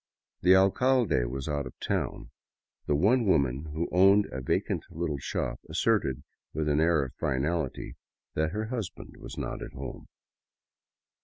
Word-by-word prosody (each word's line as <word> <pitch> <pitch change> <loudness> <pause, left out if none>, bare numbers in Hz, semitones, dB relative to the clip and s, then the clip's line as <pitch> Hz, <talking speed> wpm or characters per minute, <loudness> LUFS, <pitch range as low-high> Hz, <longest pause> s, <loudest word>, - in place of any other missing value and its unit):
The 90 +2 +6
alcalde 100 - +3
was 65 +3 -4
out 70 -2 -2
of - - -13
town; - - -2 0.6
the 75 - +2
one 110 - +4
woman 70 -4 +2
who 80 +3 -3
owned 95 +3 +6
a 65 - -4
vacant 65 - 0
little 80 -3 -3
shop - - -3
asserted 80 - +1 0.3
with 80 0 -1
an 75 0 +2
air 80 -3 +3
of 65 - -9
finality 75 +2 -1 0.4
that 80 0 +1
her 110 +3 -3
husband 115 -8 -6
was - - -9
not - - -4
at - - -7
home. - - -7
80 Hz, 150 wpm, -29 LUFS, 70-95 Hz, 0.6 s, The